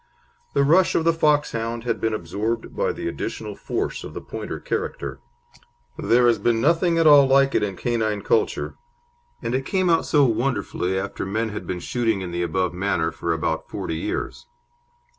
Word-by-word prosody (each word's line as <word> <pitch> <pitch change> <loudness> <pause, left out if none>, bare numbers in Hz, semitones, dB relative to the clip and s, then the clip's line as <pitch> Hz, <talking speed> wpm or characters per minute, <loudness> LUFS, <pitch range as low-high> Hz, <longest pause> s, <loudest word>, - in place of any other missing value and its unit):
The 140 - +4
rush 170 +6 +4
of 165 - +2
the 165 0 +3
Foxhound 130 -7 0
had 115 -2 -2
been 110 - +1
absorbed 110 +4 -3
by - - +1
the - - -5
additional - - -4
force - - -3
of - - -9
the - - -3
Pointer - - -6
character. 70 -1 -4 0.8
There 120 +1 +3
has 120 -1 +4
been 115 -1 +2
nothing 165 +5 +2
at 165 - +3
all 145 -3 +8
like 135 0 +4
it - - +2
in 100 -2 -2
canine 110 -1 -1
culture, - - 0 0.7
and 115 +1 -2
it 130 +1 0
came 185 +4 +1
out 165 - +2
so 145 -2 +4
wonderfully 115 -6 -1
after 100 +1 -3
men 110 +4 -1
had 105 - -6
been 90 - -3
shooting 115 -5 0
in 90 -2 -5
the 85 0 -2
above 90 +1 0
manner 90 -3 0
for 85 +1 -3
about 80 0 -2
forty 80 - -4
years. 85 - -4
115 Hz, 180 wpm, -23 LUFS, 95-140 Hz, 0.8 s, all